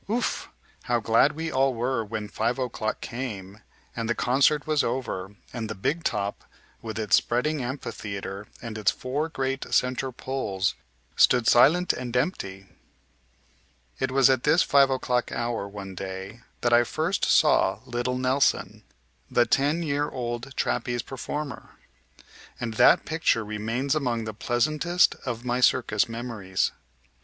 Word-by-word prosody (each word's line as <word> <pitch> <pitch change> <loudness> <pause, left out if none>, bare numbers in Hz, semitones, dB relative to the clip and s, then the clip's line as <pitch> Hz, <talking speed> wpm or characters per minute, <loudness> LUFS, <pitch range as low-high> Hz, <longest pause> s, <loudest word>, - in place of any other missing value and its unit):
Ouf! 235 +3 -1 0.4
How 120 -1 +1
glad 115 +6 +3
we 165 +1 -4
all 135 -1 +2
were 120 0 -1
when 105 0 -5
five 115 +4 -1
o'clock 120 -4 -3
came, 105 -5 -6 0.4
and 115 -1 -3
the 120 - +1
concert 140 +4 +2
was 155 -2 +2
over, 105 -6 -3 0.2
and 115 -3 -4
the 110 - -4
"big 150 - -1
top," 100 -2 -2 0.4
with 110 -1 -6
its 105 -4 +4
spreading 140 +5 0
amphitheater 105 -6 -5 0.2
and 110 -2 -5
its 105 - +3
four 145 +5 -2
great 135 -2 -3
center 130 +1 +1
poles, 105 -8 -2 0.4
stood 125 -2 +5
silent 165 +11 +5
and 125 -1 -3
empty! 100 - -2 1.3
It - - 0
was 135 -1 +5
at 130 -2 +3
this 155 +6 +4
five 140 -1 +5
o'clock 125 -2 0
hour 120 -4 -2
one 100 -1 -8
day 95 +4 -7 0.2
that 120 -1 +2
I 120 0 +6
first 160 +9 -2
saw - - +3
little 120 +1 -2
Nelson, 130 +2 +1 0.5
the 120 - +3
ten 145 +8 +1
year 145 -1 0
old 120 +2 -5
trapeze 120 -1 -1
performer, 140 +2 -6 0.8
and 115 -2 -3
that - - +5
picture 155 -8 +1
remains 115 +6 -2
among 125 -7 0
the 110 -1 -5
pleasantest 155 +11 +2
of 120 0 -4
my 125 0 0
circus 115 -4 +3
memories. 115 -5 -2
120 Hz, 145 wpm, -26 LUFS, 110-135 Hz, 1.3 s, I